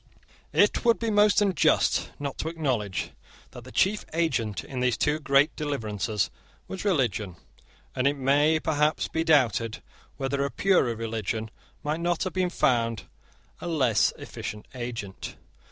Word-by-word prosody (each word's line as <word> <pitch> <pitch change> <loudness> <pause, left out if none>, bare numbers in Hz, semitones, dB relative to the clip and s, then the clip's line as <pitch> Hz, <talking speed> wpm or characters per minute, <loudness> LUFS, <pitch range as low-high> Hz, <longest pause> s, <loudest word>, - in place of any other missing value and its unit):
It - - +3
would 235 -1 +4
be 230 -1 -1
most 210 0 +5
unjust 190 -6 +2
not 140 -1 -5
to - - -2
acknowledge 130 - -2 0.4
that 125 -2 -11
the 130 - -11
chief 205 +8 +2
agent 130 - 0
in 130 - -6
these 125 -2 +1
two 150 +1 +1
great 140 +1 +3
deliverances 110 - -2 0.4
was 190 - -6
religion; 120 - 0 0.6
and 130 +1 +2
it 140 +1 +1
may 145 +4 +3
perhaps 150 -1 +1
be 160 - -1
doubted 120 -8 +2 0.3
whether 140 +1 -1
a 140 - -1
purer 175 -10 +2
religion 110 -1 -3 0.3
might 150 +2 -1
not 175 0 0
have 185 - -3
been 185 -1 +1
found 115 -8 +1 0.6
a - - -6
less 130 -10 +3
efficient 105 0 -7
agent. 120 -6 -6
140 Hz, 145 wpm, -27 LUFS, 115-160 Hz, 0.6 s, most